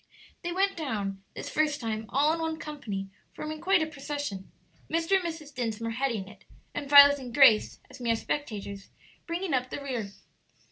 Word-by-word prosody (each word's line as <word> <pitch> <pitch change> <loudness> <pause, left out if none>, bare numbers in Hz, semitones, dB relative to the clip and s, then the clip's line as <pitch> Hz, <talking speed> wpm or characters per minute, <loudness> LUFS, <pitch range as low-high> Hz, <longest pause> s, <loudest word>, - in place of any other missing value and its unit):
They 345 - -3
went 390 +2 +1
down, 205 - -3
this - - -6
first 300 -1 +1
time, 220 -2 -3
all 295 +3 +3
in 330 - -3
one 320 -1 -2
company, 210 -12 -5 0.2
forming 310 0 -5
quite 365 -2 +3
a - - 0
procession; 285 -9 -5 0.4
Mr. 330 +2 0
and 380 - -3
Mrs. 320 -4 -6
Dinsmore 230 -2 -2
heading 230 -5 -1
it, 205 -1 -15 0.3
and 285 -1 -5
Violet 285 0 +9
and 250 -2 -7
Grace, 230 -5 +5
as - - -13
mere 230 -1 +2
spectators, 205 -7 -4 0.4
bringing 345 0 -2
up 255 -1 0
the - - -4
rear. 245 -8 -4
280 Hz, 175 wpm, -28 LUFS, 225-310 Hz, 0.4 s, Violet